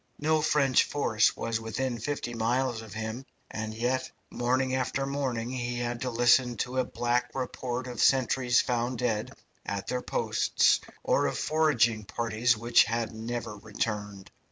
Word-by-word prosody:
No 155 +1 +2
French 140 -4 +3
force 110 -7 +1
was 115 -1 -2
within 120 +2 -3
fifty 120 0 -3
miles 120 +1 0
of 110 -2 -11
him, 110 +3 -4 0.3
and 110 0 -4
yet 125 +3 -1 0.2
morning 130 +2 0
after 130 +1 -1
morning 130 -4 -2
he 120 -1 -3
had 120 0 -3
to 130 - -1
listen 120 0 +3
to 130 +1 -2
a - - +3
black 125 0 -1
report 125 -1 -3
of 125 -3 -4
sentries 130 -2 +3
found 120 0 -1
dead 110 -3 -1 0.3
at 100 -1 -4
their 125 - -2
posts, - - +2 0.2
or - - +2
of - - -2
foraging 120 -9 +2
parties 115 +2 +1
which 115 +2 +4
had 115 +1 -2
never 115 0 -5
returned. 105 -2 -4
120 Hz, 155 wpm, -28 LUFS, 115-130 Hz, 0.3 s, which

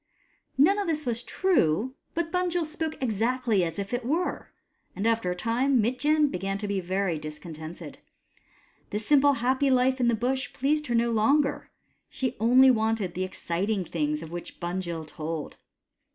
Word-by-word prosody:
None 370 +10 +5
of 400 - -2
this 310 -2 -1
was 235 -1 0
true, 255 - +1 0.2
but 330 0 -1
Bunjil 355 -2 0
spoke 315 0 -4
exactly 230 -2 +1
as 165 -1 -3
if 200 +2 -4
it 245 0 -1
were, 325 +9 -2 0.4
and 200 - -3
after 225 -4 +1
a 180 - -1
time 240 +7 +1
Mitjen 290 +6 +2
began 195 +2 -2
to 205 +1 -4
be 200 -1 -1
very 185 -2 -1
discontented. 155 +1 -8 0.9
The 210 - -2
simple 285 +6 +4
happy 260 +2 +1
life 260 0 +3
in 245 - +2
the 235 - +3
Bush 260 +4 -1
pleased 300 +3 0
her 240 - 0
no 235 0 +2
longer; 275 +6 +2 0.4
she 260 -1 -3
only 255 +4 +6
wanted 220 -5 0
the 185 - -2
exciting 185 +2 -2
things 150 -1 -2
of 160 - -9
which 175 0 -8
Bunjil 175 -2 -3
told. 155 0 -6
230 Hz, 165 wpm, -27 LUFS, 185-270 Hz, 0.9 s, only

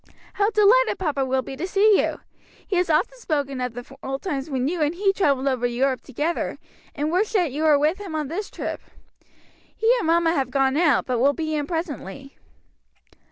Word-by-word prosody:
How 410 0 +2
delighted 445 +4 +4
papa 300 -7 -1
will 260 0 0
be 270 - -7
to 335 +7 -4
see 405 +2 +4
you. - - -3 0.4
He 380 - -1
has 360 -1 +1
often 405 +11 +1
spoken 280 - -2
of 250 -2 -3
the 245 +2 -9
old 270 0 -5
times 290 -5 -3
when 260 -2 -1
you 335 +1 -2
and 300 +3 +1
he 390 +1 +2
travelled 280 -8 +1
over 250 -2 +1
Europe 255 +2 0
together, 295 +6 -3 0.4
and 300 +1 -1
wished 390 +6 0
that 355 -9 +2
you 290 +4 -4
were 310 -2 +5
with 310 +7 +1
him 385 -6 -6
on 305 -2 -2
this 385 +8 -4
trip. - - -5 0.9
He 455 +2 +3
and 370 - -2
mamma 335 0 +3
have 270 -5 -1
gone 270 0 +1
out, 300 -5 +3
but 250 -2 -1
will 280 +4 +4
be 315 0 -3
in 295 -2 -1
presently." 280 - -5
300 Hz, 205 wpm, -23 LUFS, 270-360 Hz, 0.9 s, were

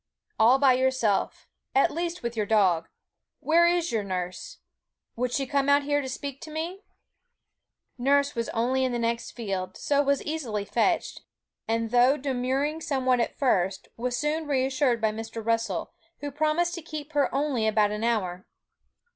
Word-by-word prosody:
'All 235 +4 +6
by 270 -2 +5
yourself 255 -5 0 0.3
at 270 - +4
least 340 -1 -3
with 235 0 -3
your 210 -2 -1
dog. 185 -6 +3 0.5
Where 340 +2 +4
is 345 0 +1
your 220 -2 0
nurse? 180 -2 -5 0.6
Would 245 +1 -1
she 270 +2 0
come 280 +1 0
out 285 0 +5
here 290 0 +1
to 265 - -5
speak 275 +1 -6
to 315 - -8
me?' 330 +5 -4 1.2
Nurse 280 +2 +2
was 230 -2 -3
only 255 +3 0
in 255 -1 0
the - - 0
next 235 0 -1
field, 195 -6 -4
so 285 -1 +2
was 280 -1 +1
easily 245 -10 -3
fetched, - - 0 0.5
and 225 0 -1
though 250 +4 +5
demurring 270 +3 -1
somewhat 260 -4 +1
at 235 - -1
first, 190 -8 0
was 245 +1 -2
soon 300 +3 -1
reassured 260 -3 +1
by 220 -1 +2
Mr. 225 0 -7
Russell, 230 0 -1 0.3
who 290 0 -4
promised 310 +4 +1
to 345 - -5
keep 310 -1 -8
her 290 -1 +2
only 270 -5 0
about 210 -1 +3
an 210 +1 -3
hour. 190 -6 -1
255 Hz, 165 wpm, -27 LUFS, 225-290 Hz, 1.2 s, All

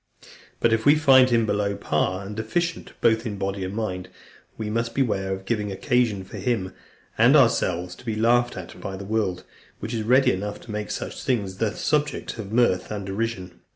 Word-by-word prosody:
But 115 - +3
if 115 0 +1
we 145 +1 +6
find 135 -4 +6
him 115 -2 +3
below 100 -1 0
par, 95 +1 -1
and 105 +2 -7
deficient 165 +11 -2
both 115 -1 +3
in 105 -4 -4
body 95 0 -3
and 95 +2 -4
mind, 90 -5 -3 0.5
we 110 - -4
must 115 +2 -2
beware 100 -8 0
of 95 0 -4
giving 105 -3 -1
occasion 110 -1 +1
for 95 - -10
him 100 -7 -1 0.5
and 120 +6 +6
ourselves 90 - +3
to - - -15
be 110 -2 -2
laughed 120 +2 +2
at - - -9
by 95 -1 -5
the 100 - -7
world, 100 -4 -1 0.4
which 110 - -5
is 115 - -1
ready 125 +5 +4
enough 105 +2 -4
to 115 - -10
make 105 0 -4
such - - -5
things 100 -7 -1
the 110 -1 -1
subject 150 -5 -1
of 100 -2 -6
mirth 115 -6 +2
and 105 -2 -4
derision. 95 -2 -4
110 Hz, 195 wpm, -24 LUFS, 95-120 Hz, 0.5 s, we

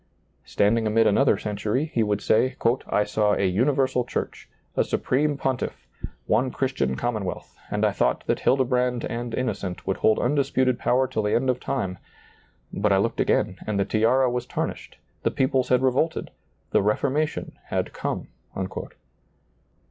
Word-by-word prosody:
Standing 110 +2 +2
amid 110 +1 +3
another 105 +1 +4
century, 105 +8 -2
he 115 - +2
would 105 -1 0
say, 130 +4 +2 0.2
" - - -19
I 105 - +2
saw 105 -1 +1
a 100 - +1
universal 130 +6 +2
church, - - -5 0.3
a - - +3
supreme 145 +2 0
pontiff, 135 -2 -3 0.4
one 120 +5 +2
Christian 130 - -1
commonwealth, 105 - -3
and - - 0
I - - +3
thought - - 0
that - - 0
Hildebrand 125 -2 +1
and 120 0 -4
Innocent 100 -7 -3
would 95 - -1
hold 110 - +3
undisputed 130 -2 +1
power 130 +1 +2
till 125 -4 -2
the 105 0 +1
end 130 +2 +2
of 125 - -4
time; 95 -11 -3 0.7
but 100 +1 +1
I 95 - +5
looked 110 +4 0
again, - - +1
and 105 -2 0
the 100 - +2
tiara 125 +4 +3
was 125 0 -2
tarnished, - - -4 0.2
the - - +1
peoples 130 -1 +1
had 125 0 +3
revolted, 135 +5 0 0.4
the - - +4
Reformation 140 +9 -1
had - - -2
come." - - -4
120 Hz, 155 wpm, -25 LUFS, 105-130 Hz, 0.7 s, I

